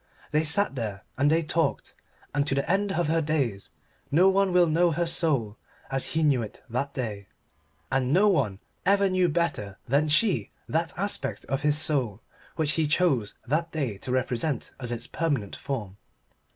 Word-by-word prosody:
They 150 +1 +2
sat 160 +3 +3
there 110 -6 -5
and 140 +2 +2
they 165 +2 +2
talked. 160 +1 -1 0.4
And 145 0 0
to 135 - +1
the 140 - -1
end 195 +3 +1
of 175 -4 0
her 165 +1 +2
days 140 -10 -1 0.4
no 175 +6 +5
one 195 0 +2
will 180 -1 +5
know 170 +2 +3
her 170 +2 0
soul 140 -11 0 0.3
as 135 -1 +1
he 160 - +2
knew 140 -5 +3
it 110 -2 -7
that 140 +4 -2
day, 105 -6 -4 0.6
and 130 -1 +1
no 190 +7 +5
one 110 - +1 0.3
ever 200 0 +3
knew 185 -1 +2
better 150 - -2
than 145 +5 +2
she 175 +7 +2 0.2
that 165 +2 0
aspect 200 +3 -2
of 135 +1 -2
his 150 0 +5
soul 130 -10 +3 0.4
which 155 -2 +1
he 160 -1 +1
chose 145 - +1
that 165 +6 -1
day 130 -11 -3
to 125 - -6
represent 130 +2 -1
as 120 -2 -4
its 120 0 -4
permanent 140 -10 -2
form. 105 -8 -5
150 Hz, 180 wpm, -26 LUFS, 125-170 Hz, 0.6 s, no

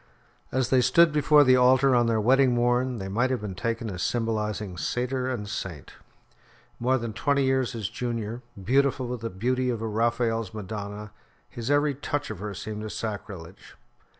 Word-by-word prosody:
As 130 -1 0
they 130 -1 +5
stood 155 +7 +5
before 150 0 +5
the 130 -2 +5
altar 130 +2 +5
on 120 -1 +3
their 115 -1 +2
wedding 130 +3 +4
morn, 120 +1 +1
they 95 -2 -5
might 120 +7 +1
have 130 - 0
been 105 -3 -5
taken 115 +4 -3
as 90 -1 -6
symbolising 105 -4 -2
satyr 125 +6 -2
and 110 -5 -3
saint. 95 -7 -6 0.9
More 130 +2 +2
than 115 -3 -4
twenty 140 +4 +1
years 130 -2 +1
his 110 -4 -3
junior, 115 +1 -4 0.2
beautiful 130 +5 +1
with 125 -2 -4
the 115 - -3
beauty 125 +6 -1
of 120 -3 -1
a 115 - -3
Raphael's 115 -1 0
Madonna, 105 0 -6 0.4
his 120 +1 -6
every 145 0 +3
touch 145 +1 -3
of - - -7
her 105 0 -5
seemed 105 +2 -6
a 110 - -5
sacrilege. 100 -6 -7
120 Hz, 175 wpm, -26 LUFS, 105-130 Hz, 0.9 s, they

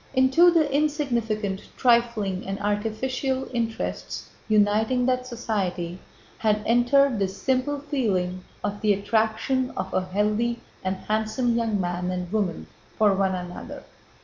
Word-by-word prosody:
Into 265 +7 +6
the 330 -3 +3
insignificant, 235 -9 0 0.2
trifling, 235 -7 +2
and 195 +1 -3
artificial 230 +6 -1
interests 230 -2 -3 0.2
uniting 215 +4 +3
that 255 0 0
society 190 -7 -3 0.4
had 210 -1 +1
entered 245 +1 +4
the 195 - +2
simple 260 +8 -1
feeling 200 -11 -1 0.2
of 205 0 -3
the 210 -1 +4
attraction 220 +5 0
of 190 - -3
a 185 - +2
healthy 210 +5 0 0.2
and 185 +1 0
handsome 220 +4 0
young 225 -3 0
man 180 0 -2
and 180 -1 -3
woman 200 -6 -1 0.3
for 210 -2 +4
one 190 -1 +1
another. 180 -1 -7
220 Hz, 125 wpm, -25 LUFS, 195-255 Hz, 0.4 s, Into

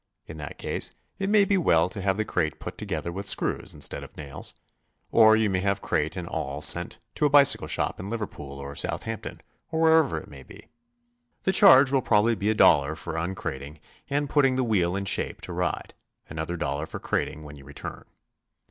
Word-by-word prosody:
In 80 - -10
that 75 -2 -8
case - - -3 0.3
it 195 0 -1
may 205 -1 +5
be 195 0 +2
well 85 - +3
to 100 +2 -6
have 95 0 0
the 110 - -1
crate 80 -8 -2
put - - -7
together 85 - -4
with 95 +3 -4
screws - - -1
instead - - -2
of - - -14
nails. 70 -3 -8 0.6
Or 110 -1 +6
you 110 -1 +2
may 95 -2 0
have 100 +1 -1
crate 80 +1 -1
and 90 -2 -5
all 70 -2 -4
sent - - +2 0.2
to 150 - +2
a - - -1
bicycle 140 - +5
shop 75 - -1
in 95 - -6
Liver 115 -1 -2
pool 70 -6 -10
or 70 0 -7
Southampton - - -4 0.3
or 160 - -2
wherever 160 - +4
it - - -7
may 70 -2 -12
be. 65 - -15 0.8
The 190 - +2
charge 140 -10 +7
will 135 -1 +2
probably 115 0 +3
be 105 -1 -1
a 110 - +1
dollar 75 -6 +4
for 85 0 -7
uncrating 80 -4 -5 0.3
and 145 +1 0
putting 135 -2 +3
the 130 - +1
wheel 95 -6 +1
in 100 0 -3
shape - - -1
to - - -7
ride; - - -3 0.3
another 80 +3 -4
dollar 75 -1 -3
for - - -7
crating 80 - -3
when 75 -1 -10
you 70 - -14
return. 70 +1 -9
95 Hz, 205 wpm, -26 LUFS, 75-130 Hz, 0.8 s, charge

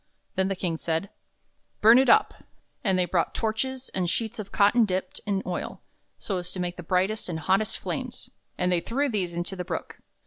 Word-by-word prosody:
Then 190 0 +1
the 195 - -1
King 175 -3 -2
said: 165 +4 -2 0.7
"Bum 225 +4 +8
it 265 - +3
up!" 435 - +5 0.5
And 190 -4 +2
they 180 - +3
brought 175 -1 0
torches, 260 +4 -1
and 180 -2 0
sheets 225 +4 -1
of 200 -2 -6
cotton 210 +4 +5
dipped 185 -3 -2
in 195 -2 0
oil, 180 -1 -4 0.4
so 195 -3 -2
as 180 0 -4
to 185 - -4
make 175 -1 -2
the - - -5
brightest 185 +4 0
and 160 -2 -3
hottest 195 +5 +1
flames, - - -5 0.3
and 180 0 +1
they 175 - +3
threw 275 +9 0
these 185 -7 -1
into 175 +3 -3
the 180 - -3
Brook. - - -5
190 Hz, 200 wpm, -27 LUFS, 180-220 Hz, 0.7 s, Bum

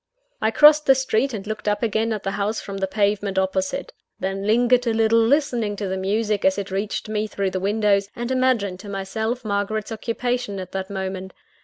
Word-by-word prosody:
I 220 - +3
crossed 300 +5 +6
the 270 - +7
street, 265 0 +1
and 210 -4 -5
looked 215 0 -5
up 205 +1 0
again 225 0 0
at 215 -2 -3
the 195 - -1
house 205 +2 -1
from 200 -1 -7
the 195 0 -1
pavement 200 -1 0
opposite. 190 0 -1 0.3
Then 195 +1 -3
lingered 245 +2 +3
a 230 - +2
little, 225 0 +4
listening 235 -4 +1
to 200 -1 -4
the 190 - -2
music 205 +2 0
as 190 0 +3
it 200 -1 -4
reached 200 +3 -2
me 215 0 -1
through 200 -2 -2
the 185 - -2
windows, 200 0 +1
and 240 +1 -4
imagining 250 -8 +1
to 205 - -9
myself 220 +5 -3
Margaret's 205 +1 -2
occupation 230 -1 -2
at 185 -1 -7
that 190 0 -4
moment. 190 -1 -5
210 Hz, 200 wpm, -23 LUFS, 195-230 Hz, 0.3 s, the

